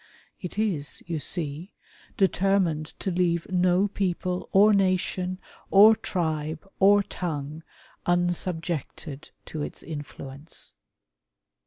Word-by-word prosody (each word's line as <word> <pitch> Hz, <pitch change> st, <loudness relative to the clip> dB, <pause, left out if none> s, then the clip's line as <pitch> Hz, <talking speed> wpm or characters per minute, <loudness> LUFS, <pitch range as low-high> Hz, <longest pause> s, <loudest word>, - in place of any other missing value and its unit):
It 180 Hz, 0 st, -7 dB
is, 185 Hz, -10 st, -1 dB
you 165 Hz, -2 st, -3 dB
see, 160 Hz, +3 st, -2 dB, 0.4 s
determined 190 Hz, -5 st, +2 dB
to 190 Hz, -, -1 dB
leave 170 Hz, -1 st, +1 dB
no 180 Hz, +2 st, +3 dB
people, 180 Hz, -2 st, -2 dB
or 210 Hz, +2 st, +6 dB
nation, 185 Hz, -1 st, +1 dB, 0.3 s
or 210 Hz, +3 st, +8 dB
tribe, 160 Hz, -3 st, -2 dB
or 200 Hz, +1 st, +6 dB
tongue, 155 Hz, -5 st, -4 dB, 0.5 s
unsubjected 175 Hz, -4 st, -1 dB, 0.2 s
to 155 Hz, -, -5 dB
its -, -, -6 dB
infiuence. 145 Hz, -1 st, -8 dB
175 Hz, 100 wpm, -26 LUFS, 155-190 Hz, 0.5 s, or